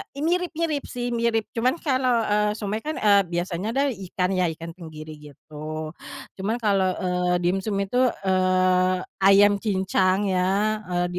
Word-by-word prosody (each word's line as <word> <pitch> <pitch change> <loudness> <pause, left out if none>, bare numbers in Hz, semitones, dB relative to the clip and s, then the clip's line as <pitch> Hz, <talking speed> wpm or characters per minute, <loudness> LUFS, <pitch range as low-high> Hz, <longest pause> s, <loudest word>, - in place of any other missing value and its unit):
E 280 - -6
mirip 355 +2 0
mirip 315 -3 -1
sih 245 0 -4
mirip 230 -2 0
cuman 250 +5 +1
kalau, 255 -5 +1
eee, 210 0 +1
somay 210 0 -3
kan, 310 +6 -4
eee, 205 -2 +4
biasanya 175 +2 -3
adalah 280 0 +2
ikan 185 -3 -3
ya, 185 -1 +1
ikan 165 +1 -8
tenggiri 155 -3 -10
gitu 155 +2 -8 0.5
cuman 205 +4 -1
kalau, 195 -3 +2
eee, 180 -1 0
dimsum 195 +4 0
itu, 225 +6 -1 0.2
eee, 185 -1 +2 0.2
ayam 200 +1 +5
cincang 190 -1 +1
ya, 195 +4 +1
eee, 175 -1 0
195 Hz, 150 wpm, -24 LUFS, 180-225 Hz, 0.5 s, ayam